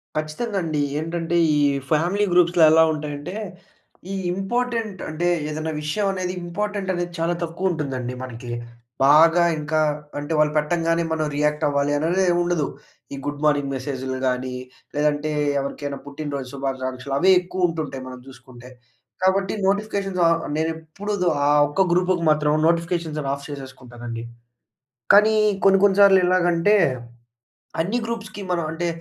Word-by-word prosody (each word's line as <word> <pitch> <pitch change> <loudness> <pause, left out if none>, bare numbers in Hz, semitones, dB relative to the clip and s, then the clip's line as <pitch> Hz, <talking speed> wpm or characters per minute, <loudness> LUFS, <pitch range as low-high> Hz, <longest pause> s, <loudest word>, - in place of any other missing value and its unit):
ఖచ్చితంగండి. 155 0 -2 0.2
ఏంటంటే, 165 +1 -3 0.2
ఈ - - +2 0.3
ఫ్యామిలీ 175 +7 +2
గ్రూప్స్‌లో 175 -1 +4
ఎలా 160 0 +6
ఉంటాయంటే, 150 +3 -6 0.8
ఈ - - -2 0.2
ఇంపార్టెంట్ 225 0 -2
అంటే 170 +3 -2 0.2
ఏదైనా 155 +1 -3
విషయమనేది 185 +2 -1
ఇంపార్టెంటనేది 190 -1 -3
చాలా 170 +1 +1
తక్కువుంటుందండి 155 -8 -2
మనకీ. 120 -1 -8 0.5
బాగా 165 +4 +6 0.2
ఇంకా 150 +1 -1 0.4
అంటే 145 +3 -4
వాళ్ళు 150 0 +3
పెట్టంగానే 165 +2 +1
మనం 155 -1 0
రియాక్టవ్వాలి 145 -1 +1
అనేది 170 +6 +1
ఏమి 175 0 +2
ఉండదు. 175 -4 0 0.5
ఈ - - -3
గుడ్ 145 0 -4
మార్నింగ్ 145 -2 +2
మెసేజ్‌లు 130 0 -4
గానీ, 125 0 -2 0.4
లేదంటే 150 +1 0 0.3
ఎవరికైనా 140 0 -4
పుట్టిన 145 +1 -6
రోజు 135 -2 -5
శుభాకాంక్షలు, 135 -1 -4
అవే 190 +4 +5
ఎక్కువుంటుంటాయి 165 -7 -2
మనం 130 0 -9
జూసుకుంటే. 130 -2 -14 0.5
కాబట్టి 190 +1 +2
నోటిఫికేషన్స్ 200 -2 -1
ఆహ్, 165 0 +2 0.2
నేనెప్పుడూ 160 +6 -4 0.3
ఆ - - +4 0.2
ఒక్క 190 +6 +1
గ్రూప్‌కి 180 -1 +1
మాత్రం 150 0 +2 0.2
నోటిఫికేషన్స్ 170 -2 -1
అన్ని 135 -1 -2
ఆఫ్ 140 0 -11
చేసేసుకుంటానండి. 120 -4 -8 0.9
కానీ 215 +2 +6 0.3
కొన్ని 195 0 +6
కొన్ని 200 -1 +4
సార్లు 195 -1 +7
ఎలాగంటే 180 +2 +3 1.1
అన్ని 200 +9 -1
గ్రూప్స్‌కి 220 -3 -6
మనం 170 -1 0
అంటే 170 +1 -2
160 Hz, 125 wpm, -22 LUFS, 145-185 Hz, 1.1 s, సార్లు